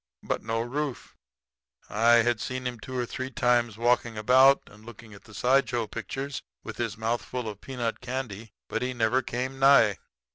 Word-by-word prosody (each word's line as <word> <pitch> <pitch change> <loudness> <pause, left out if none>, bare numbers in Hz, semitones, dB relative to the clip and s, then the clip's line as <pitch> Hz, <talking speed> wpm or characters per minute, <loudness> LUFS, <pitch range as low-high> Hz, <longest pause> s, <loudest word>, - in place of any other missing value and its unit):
But, - - -2
no 115 +1 -2
Rufe. 135 +3 -4 0.7
I'd 115 +1 +3
seen 130 0 -4
him 125 -2 -4
two 130 +4 -6
or 125 - 0
three 130 +2 -5
times 120 -3 +1
walking 120 -1 +1
about 130 +5 +5
and 105 0 -17
looking 115 -1 -12
at 100 - -15
the 110 - -15
side 130 +5 +3
show 120 -2 -1
pictures 135 +6 -5 0.2
with - - -8
his 115 -3 -3
mouth 115 +2 -1
full 125 -2 -5
of 105 -2 -7
peanut 120 -4 -3
candy; 120 -4 -5 0.2
but - - -3
he 125 0 -2
never 120 +3 +2
came 130 +2 -4
nigh. 135 - +5
120 Hz, 180 wpm, -27 LUFS, 115-130 Hz, 0.7 s, about